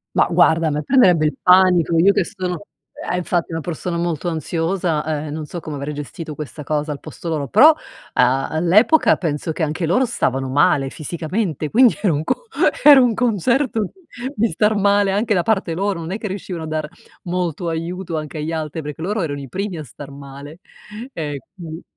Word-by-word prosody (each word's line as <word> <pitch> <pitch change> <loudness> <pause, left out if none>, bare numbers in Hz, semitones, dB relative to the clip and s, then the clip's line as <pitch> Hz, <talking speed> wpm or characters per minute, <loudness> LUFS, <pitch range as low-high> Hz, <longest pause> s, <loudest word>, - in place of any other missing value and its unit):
Ma - - +4
guarda 160 0 +3
a - - +2
me 150 0 -2
prenderebbe 180 - +4
il 150 - 0
panico, 180 -3 +5
io 190 +5 +5
che - - +2
sono 185 0 -5 0.4
eh 180 - 0
infatti 175 -1 -1
una 165 - -2
persona 170 +2 -4
molto 170 0 -2
ansiosa, 165 0 -1 0.2
ehm, 150 - -6
non 155 0 -5
so 175 - -6
come 155 -2 -7
avrei 140 +2 -4
gestito 150 +2 -7
questa 150 0 -7
cosa 150 +1 -2
al 140 - -9
posto - - -9
loro, 150 -3 -2
però 310 - +7 0.4
a 130 +2 +2
all'epoca 185 - +4
penso 160 -1 -2
che 160 - -5
anche 160 +3 -1
loro 220 +11 +3
stavano 135 - -1
male 135 0 +2
fisicamente 160 - -3
quindi 245 - +5
era 195 -6 +2
un 150 +1 -1
co 480 - -2 0.4
era 285 -2 +9
un 245 -2 +3
concerto 235 - +1
di 375 - -14 0.3
di 230 0 +2
star 210 +6 +1
male 200 0 +3
anche 210 +3 +1
da 180 - +2
parte 190 -3 0
loro, 195 +1 -1
non 165 +1 -6
è 200 - -3
che 220 - -4
riuscivano 185 -4 -5
a - - -7
dar 155 -1 -3 0.4
molto 175 -1 -2
aiuto 165 +2 -4
anche 155 0 -5
agli 155 +2 -3
altri 160 0 -4
perché 150 +1 -7
loro 205 +3 -1
erano 145 -3 -3
i 135 - -9
primi 190 0 -4
a - - -5
star 140 +1 -11
male. 140 +3 -11 0.5
E 145 -3 -4 0.2
quindi 165 -3 -8
165 Hz, 200 wpm, -20 LUFS, 150-195 Hz, 0.5 s, era